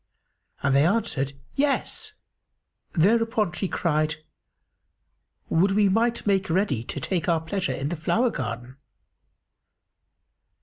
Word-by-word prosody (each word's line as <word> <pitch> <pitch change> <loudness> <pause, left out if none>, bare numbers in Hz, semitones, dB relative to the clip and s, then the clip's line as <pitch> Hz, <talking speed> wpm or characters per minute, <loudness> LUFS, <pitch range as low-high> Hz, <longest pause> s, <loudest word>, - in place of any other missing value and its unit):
and 140 -1 +3
they 140 - +5
answered, 170 - 0 0.2
"Yes!" 290 +9 -1 0.8
Thereupon 220 +3 +2
she 190 +2 -2
cried, 155 -3 0 1.3
"Would 190 +4 +3
we 205 0 +4
might 230 +4 +1
make 195 -3 +1
ready 160 - +1
to - - -4
take 175 -3 -1
our 165 -1 +3
pleasure 180 +4 -2
in 140 +2 -3
the 175 - -2
flower 230 +9 +1
garden!" 120 0 -5
180 Hz, 115 wpm, -25 LUFS, 150-215 Hz, 1.3 s, they